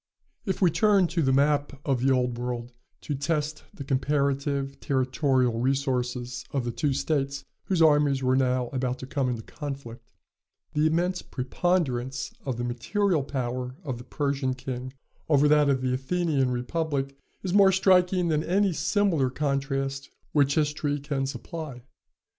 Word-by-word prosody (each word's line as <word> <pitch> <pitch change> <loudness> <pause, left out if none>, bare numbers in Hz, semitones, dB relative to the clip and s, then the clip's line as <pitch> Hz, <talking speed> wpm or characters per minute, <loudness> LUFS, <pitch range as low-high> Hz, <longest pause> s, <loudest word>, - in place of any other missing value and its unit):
If 190 0 0
we 175 - +5
turn 205 0 +4
to 170 0 0
the 135 -3 +2
map 145 0 +2
of 135 -4 +1
the 135 +1 +3
Old 125 -2 +1
World, 120 0 -4 0.3
to 150 - -3
test 150 +2 -2
the 140 - -8
comparative 140 0 0
territorial 130 -2 +1
resources 125 -2 -1
of 135 -4 -2
the 120 - -1
two 145 +4 0
states 140 0 -1 0.2
whose 180 -4 +2
armies 145 -3 +4
were 130 0 +3
now 125 -2 +1
about 130 -1 -2
to 130 - -7
come 135 -1 -1
into 115 -2 -3
conflict, 140 -5 -8 0.6
the 150 +1 +3
immense 175 +3 0
preponderance 130 -2 -1
of 130 -4 -2
the 120 - -2
material 160 - 0
power 125 -2 -3
of 130 -6 -4
the - - -9
Persian 135 -1 -1
king 130 0 -5 0.4
over 145 -1 +5
that 150 -1 +4
of 130 -2 +2
the 130 -1 0
Athenian 140 0 0
republic 140 +2 -2 0.3
is 185 -2 -2
more 195 -1 +7
striking 180 -1 +3
than 155 -1 +1
any 195 +2 +2
similar 160 -3 +1
contrast 135 0 -2 0.2
which 140 -2 +3
history 150 -1 0
can 140 -1 -2
supply. 135 0 -7
140 Hz, 155 wpm, -27 LUFS, 130-155 Hz, 0.6 s, more